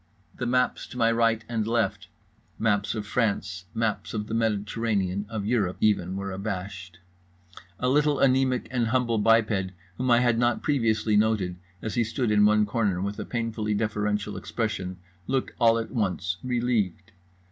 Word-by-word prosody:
The 125 - -4
maps 125 +1 +1
to - - -10
my 115 -1 +3
right 115 -1 +2
and 110 -2 -1
left, 105 -4 0 0.5
maps 105 -2 +1
of 105 -1 -4
France, 100 -5 -1
maps 110 -1 -1
of 105 -1 -2
the 110 - -6
Mediterranean, 105 -3 0
of 110 -3 -4
Europe, 105 -5 0
even, 95 -4 +1
were 100 0 -4
abashed. 95 -2 -5 0.8
A 125 - 0
little 145 +2 +3
anaemic 130 -1 +2
and 120 -3 +1
humble 120 -2 +1
biped 105 -4 +2 0.3
whom 130 0 0
I 120 0 +5
had 120 -2 +2
not 120 -1 +1
previously 115 -7 +1
noted, 105 -4 +1 0.3
as 110 - -3
he 120 - +2
stood 115 +1 -1
in 105 0 +5
one 105 0 +4
corner 105 -4 0
with 100 +2 -3
a - - -4
painfully 115 -3 -2
deferential 105 -1 -1
expression, 100 -5 -3 0.3
looked 135 -1 0
all 115 -1 +5
at 115 - -4
once 95 -6 -1
relieved. 120 -5 -1
110 Hz, 160 wpm, -26 LUFS, 100-115 Hz, 0.8 s, I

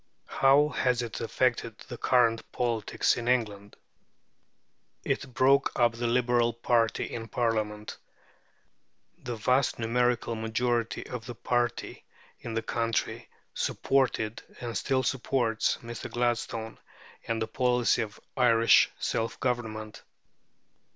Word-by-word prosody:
How 140 +2 +4
has 125 -4 0
it 115 -2 -6
affected 115 -1 0
the 125 - -6
current 115 -3 +2
politics 115 -4 0
of 120 0 -4
England? 105 -5 -1 1.3
It 135 - -2
broke 135 +3 +3
up 120 -1 +5
the 120 +1 -3
Liberal 120 -1 +2
party 115 -1 +1
in 115 -1 -6
Parliament. 110 -2 -2 1.2
The 120 - -5
vast 125 +5 +1
numerical 120 +1 +1
majority 115 +1 -1
of 125 -2 -7
that 120 -2 -9
party 120 0 -1 0.4
in 115 - -6
the 115 - -1
country 115 0 -2 0.2
supported, 125 -5 0 0.2
and 120 -2 -5
still 130 -1 0
supports, 120 -4 0
Mr. 115 0 -7
Gladstone 115 -2 -2 0.5
and 115 -1 -1
the 110 - 0
policy 125 -1 +2
of 110 -1 -6 0.2
Irish 115 -2 +5
self 115 0 -2
government. 110 -4 -3
120 Hz, 115 wpm, -28 LUFS, 115-125 Hz, 1.3 s, up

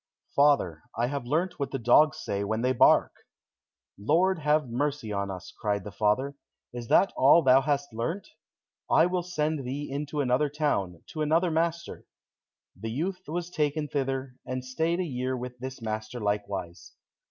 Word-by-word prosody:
"Father, 140 - +3 0.2
I 120 - +2
have 135 -1 -4
learnt 170 +6 -1
what 140 -2 -1
the 135 - -3
dogs 130 +4 +4
say 100 0 -2
when 110 +3 -2
they 130 - +3
bark." 120 - +5 0.9
"Lord 170 - +2
have 150 -1 +2
mercy 130 -2 -2
on 100 0 -2
us!" 95 0 -8
cried 100 -2 -1
the 105 - -7
father; 110 +8 +1 0.4
"is 120 -1 -6
that 195 - +4
all 145 +5 +6
thou 130 +1 +6
hast 140 -3 -1
learnt? 165 - -3 0.6
I 160 - +5
will 180 0 0
send 155 -4 -2
thee 140 +4 -4
into 145 +1 -3
another 135 +2 +2
town, 120 - -1
to 155 - -4
another 165 +3 +2
master." 170 +1 -2 0.7
The 110 - -6
youth 180 +10 -3
was 175 +3 -4
taken 150 -2 -1
thither, 135 -2 -3
and 130 0 -5
stayed 160 +7 -1
a - - +1
year 130 -4 -2
with 125 0 -7
this 130 -1 -7
master 110 +2 -4
likewise. 100 -4 -3
135 Hz, 165 wpm, -28 LUFS, 115-155 Hz, 0.9 s, all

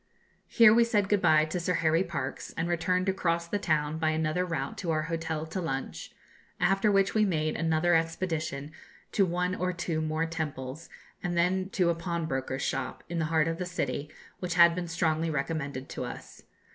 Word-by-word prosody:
Here 230 -2 +7
we 235 +1 +6
said 210 -4 +1
good 205 -2 +3
bye 155 -2 +5
to 155 +3 -3
Sir 175 +1 0
Harry 165 +1 +2
Parkes, 170 - -5
and 165 +1 0
returned 180 +2 0
across 170 -3 0
the 205 +4 -1
town 155 -3 0
by 160 -1 +2
another 155 +2 0
route 150 -5 -3
to 175 - -3
our 155 -1 +1
hotel 160 -1 -3
to 170 +4 -4
lunch, 135 -5 -4 0.5
after 195 +2 +3
which 195 0 +3
we 215 - +3
made 155 -6 0
another 165 +1 +2
expedition 160 -3 -1 0.4
to 195 -2 +3
one 180 +1 0
or 180 0 -1
two 170 -2 -2
more 155 +1 0
temples, 155 -3 -5 0.3
and 175 -2 -2
then 185 +2 +1
to 185 -6 +2
a - - +1
pawnbroker's 160 -6 -3
shop, - - -3
in 170 -1 -2
the 160 - +1
heart 160 0 +2
of 165 +1 -2
the 180 - -2
city, 145 -4 -3 0.3
which 175 -2 -3
had 170 -1 +7
been 175 0 -3
strongly 165 -1 0
recommended 140 -2 -3
to - - -4
us. 125 - -9
165 Hz, 190 wpm, -29 LUFS, 155-180 Hz, 0.5 s, Here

